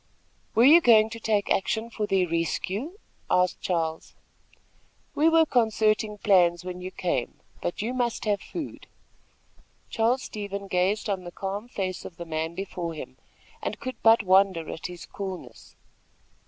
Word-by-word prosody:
"Were 230 - +5
you 310 +6 +8
going 220 -5 +5
to 230 - -7
take 215 -2 0
action 220 +4 0
for 215 -2 -2
their 190 -2 +2
rescue?" 190 - -2 0.3
asked 180 0 +2
Charles. 165 -3 -2 1.0
"We 315 +2 +4
were 325 0 +5
concerting 220 -4 +1
plans 180 -4 +3
when 180 0 -6
you 185 - -5
came; 170 -9 -2 0.2
but 175 - -3
you 240 +3 -2
must 240 -3 -1
have 205 -2 +1
food." 325 -4 -7 1.0
Charles 235 +3 +1
Stevens 200 -1 -6
gazed 185 +5 +1
on 195 -3 -2
the 175 - -8
calm 195 +5 -5
face 190 -6 -4
of 170 - -10
the 170 - -6
man 160 +1 -3
before 175 -3 -4
him, 130 -3 -9 0.4
and - - -4
could 255 -1 -6
but 225 0 +6
wonder 190 -3 +3
at - - -5
his 175 -1 -9
coolness. 185 - -8
195 Hz, 155 wpm, -26 LUFS, 180-225 Hz, 1.0 s, you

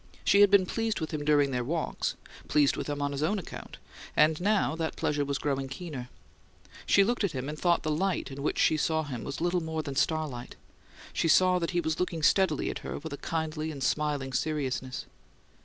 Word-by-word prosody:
She 200 - +5
had 205 - +8
been 200 -2 +5
pleased 225 +3 -1
with 160 - -4
him 150 -2 -3
during 145 -2 +3
their 125 -1 -1
walk; 160 +6 -3 0.4
pleased 145 -2 +3
with - - -4
him 145 0 -2
on 145 - 0
his 140 0 -3
own 170 +8 +1
account; 190 - -8 0.4
and 155 +2 +4
now 200 -4 +2
that 160 -1 -3
pleasure 145 -1 0
was 140 -1 -1
growing 135 -2 -1
keener. 135 -3 -7 0.8
She 200 - +6
looked 235 +2 0
at 195 - 0
him, 130 0 -4
and 150 - -4
though 170 +2 +3
the 155 - -2
light 180 0 -1
in 135 +1 -7
which 150 - -1
she 155 - +4
saw 160 +1 +1
him 130 -6 -5
was 140 - -5
little 175 +1 +1
more 160 -1 -3
than 140 -2 -5
starlight, 145 -5 -1 0.6
she - - +1
saw 180 +3 +5
that 170 - -1
he 175 -1 0
was 160 -1 -2
looking 170 -3 -2
steadily 180 -4 +3
at - - -6
her - - -5
with 160 0 -7
a - - -5
kindly 160 0 -3
and 140 -4 -5
smiling 145 -1 0
seriousness. 130 -3 -2
155 Hz, 215 wpm, -29 LUFS, 140-170 Hz, 0.8 s, had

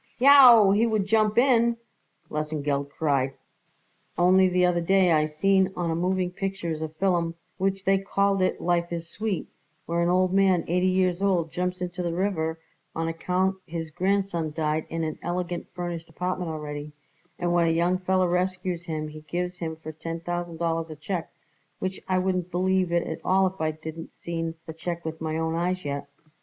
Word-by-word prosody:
"Yow, 250 -6 +8
he 215 +4 +3
would 215 -3 +1
jump 215 +1 +2
in!" 235 -2 +4 0.5
Lesengeld 150 -2 -2
cried. 135 -3 0 0.8
"Only 185 +2 +5
the 180 0 +3
other 175 -1 +2
day 185 +1 +3
I 155 -1 +3
seen 190 +5 +2
on 170 -2 -1
a - - 0
moving 180 +1 0
pictures 185 -5 -3
a 160 - -3
fillum 170 0 0 0.2
which 195 0 -1
they 195 0 +4
called 195 0 +1
it 185 - +1
Life 175 0 0
is 170 -1 -4
Sweet, 210 0 -3 0.4
where 170 +1 0
an 170 - +2
old 185 +1 +2
man 190 -3 +3
eighty 180 +2 +2
years 185 -1 +1
old 180 -5 +1
jumps 180 0 -2
into 180 0 -3
the 170 -1 -2
river 165 -4 -1 0.4
on 165 0 -1
account 185 +3 0
his 165 -1 -5
grandson 185 -2 0
died 155 0 -1
in 165 0 -2
an 155 -1 -3
elegant 175 0 -3
furnished 175 -2 -5
apartment 180 +1 -3
already; 150 -1 -6 0.4
and 175 -1 0
when 170 -1 +3
a - - +3
young 175 +3 +2
feller 185 0 +2
rescues 180 -1 -1
him 155 -2 -3
he 155 0 -10
gives 180 +3 -4
him 160 -2 -3
for 155 0 -8
ten 165 +2 -6
thousand 175 0 -4
dollars 165 -1 -1
a 155 - -7
check, 165 +3 -4 0.5
which 190 0 -4
I 185 - +2
wouldn't 185 -1 0
believe 185 0 +1
it 170 0 +1
at - - -5
all 190 +1 +3
if 190 -2 -3
I 155 - +2
didn't 160 +1 -8
seen 165 -1 -4
the 160 - -7
check 170 +1 -5
with 160 0 -5
my 160 0 -2
own 160 0 -1
eyes 180 +1 -1
yet. 140 0 -4
175 Hz, 185 wpm, -26 LUFS, 160-185 Hz, 0.8 s, Yow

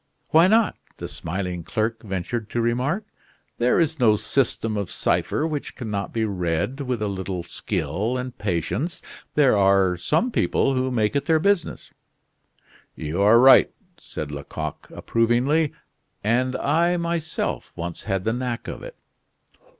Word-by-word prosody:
"Why 165 +3 +6
not?" 220 +2 +3 0.2
the - - -5
smiling 90 0 -4
clerk 110 +4 -2
ventured 105 +3 -4
to 120 - -2
remark. 125 - 0 0.5
"There 125 +6 +3
is 160 -2 +1
no 110 -4 +5
system 115 -1 0
of 100 -3 -2
cipher 150 - 0
which 150 -3 -4
can 115 -4 -6
not 100 -1 -3
be 115 -1 0
read 90 - -2
with 125 -5 -2
a - - 0
little 95 -2 -4
skill 90 - -2
and 125 -1 -5
patience; 105 - -2 0.3
there 140 -6 +5
are 95 -2 +4
some 230 - +1
people 135 - +1
who 130 0 0
make 110 -1 0
it 140 0 0
their 160 +1 +4
business." 200 +2 0 1.0
"You 80 +5 -3
are 105 +3 +6
right," 130 +2 +7 0.3
said 75 -1 -6
Lecoq, 75 +2 -6
approvingly. 125 +7 +1 0.5
"And 125 +4 +1
I, 170 +4 +2
myself, 170 -2 -2
once 85 0 -5
had 95 -3 -1
the 110 - 0
knack 125 -1 -3
of - - -6
it." - - -9
115 Hz, 150 wpm, -23 LUFS, 95-140 Hz, 1.0 s, right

